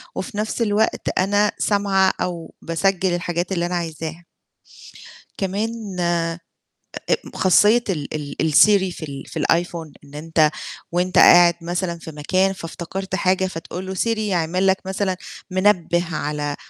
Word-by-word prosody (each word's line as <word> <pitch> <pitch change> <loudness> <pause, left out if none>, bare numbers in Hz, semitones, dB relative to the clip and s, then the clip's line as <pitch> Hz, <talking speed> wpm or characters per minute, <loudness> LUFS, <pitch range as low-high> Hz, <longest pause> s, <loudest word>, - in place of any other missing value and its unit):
وفي 240 -5 -5
نَفْس 215 +3 -2
الوقت 215 -1 +1
أنا 205 +2 +2
سامعة 200 -2 +2
أو 175 -2 -4
باسجل 185 +2 0
الحاجات 175 +1 -3
اللي 175 -2 0
أنا 180 +1 -2
عايزاها. 165 0 -5 1.1
كمان 205 0 -3
أ 175 0 +1 0.9
أ - - +6 0.2
خاصية 210 +6 +4
ال 150 -6 -4
ال 150 +1 -2
الSiri 190 +1 +5
في - - -11
ال 140 -1 -7
في - - -5
الiPhone، 170 -2 0
إن 140 0 -16
أنت 155 0 +2 0.4
وأنت 180 +1 +1
قاعد 175 -1 +8
مثلًا 175 0 -2
في 165 - -9
مكان 185 +6 +1
فافتكرت 190 +2 -6
حاجة 190 0 +1
فتقول 180 +1 -6
له 190 - -4
Siri 185 - -1
يعمل 185 -3 0
لك 190 0 +4
مثلًا 190 -1 -1 0.3
منبه 185 -2 +2
على 145 -1 -3
180 Hz, 140 wpm, -21 LUFS, 165-195 Hz, 1.1 s, قاعد